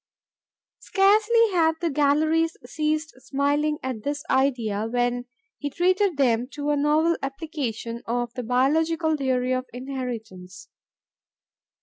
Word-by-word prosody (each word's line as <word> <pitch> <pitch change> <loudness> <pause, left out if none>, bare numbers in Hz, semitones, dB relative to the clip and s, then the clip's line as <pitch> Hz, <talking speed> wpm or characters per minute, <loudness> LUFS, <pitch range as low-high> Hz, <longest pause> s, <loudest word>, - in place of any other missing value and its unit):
Scarcely 430 +3 +3
had 325 -3 +3
the 335 -2 -1
galleries 310 +3 +2
ceased 310 +3 -2
smiling 290 +3 0
at 255 -4 -4
this 290 +3 -3
idea 235 -6 +1
when 245 +1 0 0.3
he 290 - -3
treated 365 +3 +1
them 245 -3 +2
to 295 0 -2
a - - +2
novel 305 +3 +2
application 270 -5 -4
of 240 0 -2
the 250 - -4
biological 315 +7 +1
theory 255 -3 0
of 255 0 -2
inheritance. 225 -8 -7
280 Hz, 115 wpm, -25 LUFS, 245-315 Hz, 0.3 s, Scarcely